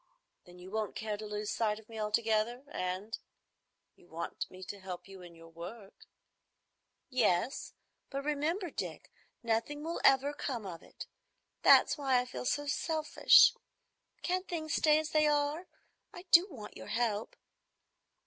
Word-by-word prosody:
Then 180 -1 -15
you 180 +1 -11
won't 215 -1 -2
care 215 -1 -3
to 215 +1 -7
lose 210 0 -3
sight 215 -2 0
of 220 -1 -14
me 225 -1 -8
altogether, 220 +3 0
and—you 185 -2 -8
want 165 +1 -5
me 185 0 -11
to 200 +2 -7
help 180 -1 -7
you 195 -1 -11
in 175 -1 -12
your 165 0 -14
work?" 190 +5 -11 1.0
"Yes; 230 -1 +1 0.3
but 275 0 -4
remember, 310 +5 -1
Dick, - - -6 0.3
nothing 235 +6 -1
will 335 +2 -3
ever 275 +2 +5
come 255 -6 -4
of 175 -3 -7
it. - - -10 0.6
That's - - +6
why 270 -3 +3
I 250 - -2
feel 250 - -6
so 290 +3 0
selfish. 310 +1 +5 0.7
Can't 365 +1 -1
things 315 -3 -3
stay 305 -1 +4
as 310 0 -2
they 305 -1 +4
are? 295 +4 0 0.4
I 355 - -10
do 350 +3 +8
want 230 - -10
your - - -9
help." 225 -2 -1
230 Hz, 150 wpm, -32 LUFS, 205-295 Hz, 1.0 s, do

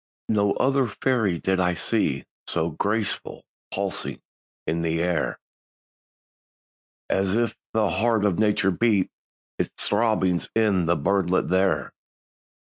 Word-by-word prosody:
No 100 -2 +2
other 135 -1 +2
fairy 110 -5 0
did 95 +3 0
I 90 -1 +2
see - - 0 0.2
So 85 0 -1
graceful, 105 +5 -1 0.3
pulsing, - - -1 0.5
in 80 +1 -1
the 80 0 0
air, 85 -1 0 1.7
As 95 +1 +1
if 120 0 0 0.2
the 110 -2 +2
heart 110 +1 +2
of 100 -3 +1
nature 105 -2 +3
beat 100 -1 +2 0.5
Its - - 0 0.2
throbbings 105 -5 +1
in 100 -6 +2
the 85 - +3
birdlet 95 +3 +1
there. 95 +1 +1
100 Hz, 115 wpm, -24 LUFS, 90-110 Hz, 1.7 s, nature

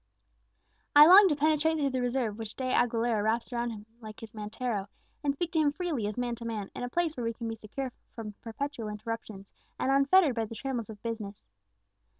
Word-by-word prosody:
I 295 +1 +11
long 385 +4 +9
to 300 - +2
penetrate 310 +2 +2
through 280 -3 +1
the 255 -1 -1
reserve 245 -3 -1
which 220 -1 -6
De 265 - -5
Aguilera 230 -2 +2
wraps 230 +3 0
around 240 0 -1
him 210 -2 -8
like 215 -2 -10
his 225 0 -10
mantero, 215 -1 -3 0.4
and 285 - +2
speak 335 +3 -2
to 320 - +1
him 295 -2 +3
freely 290 - -2
as 210 - -5
man 245 -1 -1
to 235 - -9
man, 220 -4 -4
in - - -6
a 245 - -3
place 330 +2 0
where 245 - -4
we 230 0 -1
can 230 0 -6
be 225 - -2
secure 225 +4 -5 0.2
from 215 -2 -6
perpetual 235 0 -4
interruptions, 210 -2 -6 0.2
and 265 - 0
unfettered 275 +3 +5
by 225 -1 -1
the 230 - -9
trammels 240 -2 -3
of 210 -2 -10
business. 215 -3 -5
235 Hz, 210 wpm, -29 LUFS, 220-280 Hz, 0.4 s, I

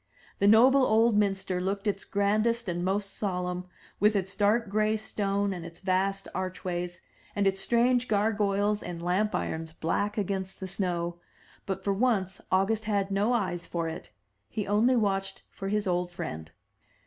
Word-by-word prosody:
The 200 - +4
noble 255 +6 +7
old 225 -1 +4
minster 195 -3 +1
looked 195 +2 -2
its 200 -1 -1
grandest 215 +3 +1
and 175 -1 -2
most 195 +2 -1
solemn, 180 -2 -2 0.3
with 210 +2 +4
its 190 -1 -1
dark 215 +2 +2
gray 215 +2 +1
stone 200 -2 -1
and 175 -2 -6
its 170 0 -10
vast 195 +1 0
archways, 180 -1 -3 0.4
and 205 -1 +1
its 195 0 +2
strange 245 +1 +2
gar 215 +1 +2
goyles 205 0 +1
and 175 -1 -6
lamp 185 +5 0
irons 160 0 -3
black 205 +6 -1
against 190 -1 -2
the 190 - -5
snow; 175 -3 -2 0.5
but 190 -1 -3
for 200 - +1
once 195 -4 0
August 205 +4 +2
had 200 -2 0
no 200 +4 +2
eyes 180 -7 -1
for 170 -1 -2
it: 160 - -7 0.4
he 210 - -3
only 220 +5 +3
watched 195 -3 -1
for 195 - -5
his 210 0 0
old 180 -1 0
friend. 80 - -6
195 Hz, 165 wpm, -28 LUFS, 185-210 Hz, 0.5 s, noble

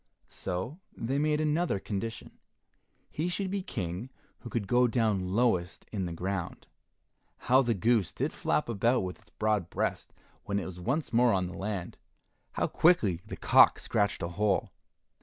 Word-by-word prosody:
So 95 - -4 0.2
they 130 +5 -1
made 150 0 +2
another 155 - +1
condition. 115 +3 -5 0.7
He 165 +4 -1
should 190 +2 -2
be 200 -1 -1
King 95 - -4 0.3
who 120 - -9
could 110 -4 -2
go 125 +2 +4
down 105 -6 0
lowest 100 -8 +1
in 95 -4 -2
the - - -5
ground. 90 +1 -4 0.7
How 130 +2 +4
the 120 -3 +1
goose 110 0 +2
did - - -2
flap - - 0
about 120 +3 +2
with 90 -1 -5
its 110 0 -24
broad 105 -5 0
breast - - -2 0.3
when 100 -1 -1
it 100 - -2
was 90 -1 -8
once 130 - -2
more 120 0 +5
on 95 -1 +1
the 90 - -6
land! 95 -3 -4 0.6
How - - 0
quickly 110 - +3
the - - -6
cock - - +6
scratched 100 -4 0
a 85 - -2
hole! 100 +2 0
110 Hz, 165 wpm, -30 LUFS, 95-125 Hz, 0.7 s, cock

